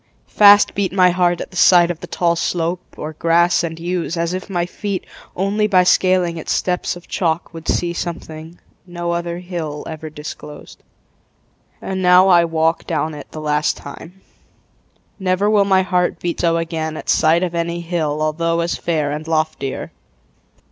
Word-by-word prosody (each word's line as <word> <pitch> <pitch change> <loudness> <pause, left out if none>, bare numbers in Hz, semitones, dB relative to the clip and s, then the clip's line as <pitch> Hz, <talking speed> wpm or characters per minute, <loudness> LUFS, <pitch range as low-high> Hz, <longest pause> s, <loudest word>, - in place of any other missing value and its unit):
Fast 205 0 +6
beat 195 -2 -1
My 185 -1 +4
heart 175 -1 +1
at - - -7
the 180 - -9
sight 175 -1 +6
of 170 - -7
the - - -9
tall 170 -1 0
slope 170 +1 -1 0.2
Or 155 +1 -6
grass 170 +2 +2
and 165 -1 -4
yews, 175 -1 -3
as 170 +1 -1
if 185 +2 -5
my 175 -3 -1
feet 195 +1 -5 0.3
Only 200 +3 0
by 185 -3 +4
scaling 180 -2 +2
its 160 - -5
steps 180 -1 -1
of 175 - -13
chalk 165 -2 -2
Would 165 0 -10
see 175 -1 0
something 165 -1 -7 0.3
no 175 -1 -4
other 170 0 -3
hill 170 -5 -5
Ever 160 0 -7
disclosed. 150 0 -10 1.0
And 190 0 -3
now 180 +1 +6
I 175 -2 +5
walk 165 0 0
Down 160 -1 -1
it 145 -2 -10
the 155 - -8
last 150 0 0
time. 175 +6 -11 1.0
Never 190 +2 +1
will 205 -2 +4
My 190 -1 +3
heart 180 -2 0
beat 175 -1 -3
so 165 -1 +2
again 160 -1 -3
at - - -9
sight 165 +2 +3
Of 175 -2 -2
any 170 0 -2
hill 155 -3 -2
although 165 +2 0
as 170 0 -1
fair 155 -4 -1
And 150 +2 -5
loftier. 155 -4 -2
170 Hz, 175 wpm, -19 LUFS, 160-180 Hz, 1.0 s, Fast